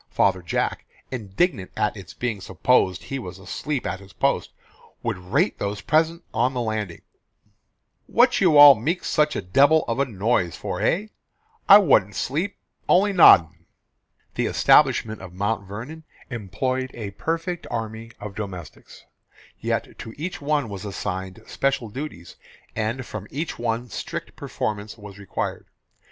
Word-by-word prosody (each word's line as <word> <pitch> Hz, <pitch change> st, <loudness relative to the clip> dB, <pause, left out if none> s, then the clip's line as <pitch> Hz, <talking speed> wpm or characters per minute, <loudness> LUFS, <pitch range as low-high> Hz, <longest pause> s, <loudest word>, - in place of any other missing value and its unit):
Father 95 Hz, -2 st, +2 dB
Jack, 85 Hz, -, -2 dB, 0.3 s
indignant 110 Hz, -, -1 dB
at 105 Hz, -, 0 dB
its 95 Hz, -3 st, -10 dB
being 115 Hz, -5 st, -3 dB
supposed 95 Hz, -1 st, +1 dB
he 135 Hz, -, -4 dB
was 90 Hz, -7 st, -8 dB
asleep 125 Hz, +9 st, -4 dB
at 90 Hz, +1 st, -3 dB
his 100 Hz, -1 st, -15 dB
post, -, -, 0 dB, 0.5 s
would -, -, -1 dB
rate 140 Hz, -, 0 dB
those 100 Hz, +1 st, -3 dB
present 165 Hz, +2 st, +1 dB
on 125 Hz, +4 st, +1 dB
his -, -, -1 dB
landing, 110 Hz, -6 st, -3 dB, 1.0 s
"What 245 Hz, 0 st, +3 dB
you 170 Hz, -6 st, +5 dB
all 145 Hz, -1 st, +11 dB
meek 150 Hz, -, -2 dB
such 150 Hz, 0 st, +1 dB
a -, -, -3 dB
debil 140 Hz, +12 st, +4 dB
of 115 Hz, +3 st, -1 dB
a 140 Hz, -, +3 dB
noise 105 Hz, -5 st, 0 dB
for, -, -, -5 dB
hey? 210 Hz, +5 st, 0 dB, 0.6 s
I 200 Hz, -, +12 dB
wa'nt 135 Hz, -, +3 dB
sleep, 165 Hz, +10 st, -2 dB, 0.3 s
only 200 Hz, +2 st, +4 dB
noddin'." 85 Hz, -, +6 dB, 0.7 s
The -, -, -1 dB
establishment 110 Hz, -2 st, +3 dB
of 95 Hz, -2 st, -10 dB
Mount 100 Hz, +1 st, -2 dB
Vernon 125 Hz, +11 st, -8 dB, 0.3 s
employed 130 Hz, +4 st, -2 dB
a 105 Hz, -4 st, -6 dB
perfect 165 Hz, -, -3 dB
army 110 Hz, 0 st, -5 dB
of 105 Hz, -1 st, -7 dB
domestics; 95 Hz, -6 st, -9 dB, 0.5 s
yet -, -, -3 dB
to 110 Hz, -, -8 dB
each 170 Hz, +3 st, -5 dB
one 145 Hz, -2 st, 0 dB
was 100 Hz, -3 st, -7 dB
assigned 95 Hz, 0 st, -5 dB
special 135 Hz, -4 st, -1 dB
duties, 115 Hz, -, -8 dB, 0.4 s
and 115 Hz, +4 st, -2 dB
from 105 Hz, -3 st, -7 dB
each 155 Hz, 0 st, -4 dB
one 120 Hz, +1 st, -2 dB
strict -, -, -6 dB
performance 105 Hz, +1 st, -4 dB
was 105 Hz, -1 st, -11 dB
required. 100 Hz, -, -4 dB
115 Hz, 145 wpm, -23 LUFS, 100-145 Hz, 1.0 s, I